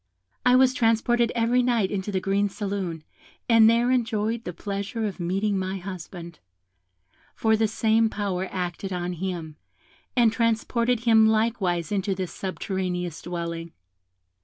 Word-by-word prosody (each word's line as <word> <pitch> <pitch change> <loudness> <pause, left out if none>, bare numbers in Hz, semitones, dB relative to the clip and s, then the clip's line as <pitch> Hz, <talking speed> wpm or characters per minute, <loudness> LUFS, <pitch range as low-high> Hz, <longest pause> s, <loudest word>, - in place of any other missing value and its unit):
I 250 0 +5
was 260 0 +5
transported 235 0 +2
every 235 +2 +3
night 235 -6 +1
into 200 0 -3
the 190 - 0
green 200 +2 +1
saloon, 195 -5 -4 0.4
and 225 -2 +7
there 235 +2 +3
enjoyed 230 -2 0
the - - -3
pleasure 200 +5 -4
of 200 -2 -4
meeting 195 +3 0
my 190 +1 -3
husband, 175 -2 -8 1.0
for 220 0 +2
the 220 0 +2
same 220 +1 +2
power 190 -3 -2
acted 180 +1 -4
on 180 0 -2
him, 170 -3 -5 0.6
and 235 -3 +4
transported 230 +1 +1
him 225 -2 +5
likewise 215 -6 0
into 195 -1 0
this 185 -2 -4
subterraneous 180 -3 -3
dwelling. 170 -1 -5
200 Hz, 135 wpm, -25 LUFS, 180-225 Hz, 1.0 s, and